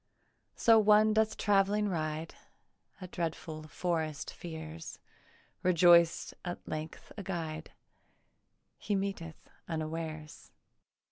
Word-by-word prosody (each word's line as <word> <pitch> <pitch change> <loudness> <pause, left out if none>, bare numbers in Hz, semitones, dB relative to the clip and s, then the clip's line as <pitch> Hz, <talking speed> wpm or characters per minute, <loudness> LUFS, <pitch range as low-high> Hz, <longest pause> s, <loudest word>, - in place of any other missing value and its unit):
So 225 -2 +6
one 215 0 +5
doth 220 0 +2
travelling 205 +1 +2
ride; 160 -3 -3 0.7
A 185 - -6
dreadful 160 -3 -4
forest 160 -2 -2
fears; 160 -1 -8 0.6
Rejoiced 170 -1 +5
at 175 -1 -6
length 155 0 -6
a - - -4
guide 165 -5 -5 1.1
He 205 - -1
meeteth 195 -5 -4 0.2
unawares. 155 -1 -5
170 Hz, 90 wpm, -32 LUFS, 155-195 Hz, 1.1 s, So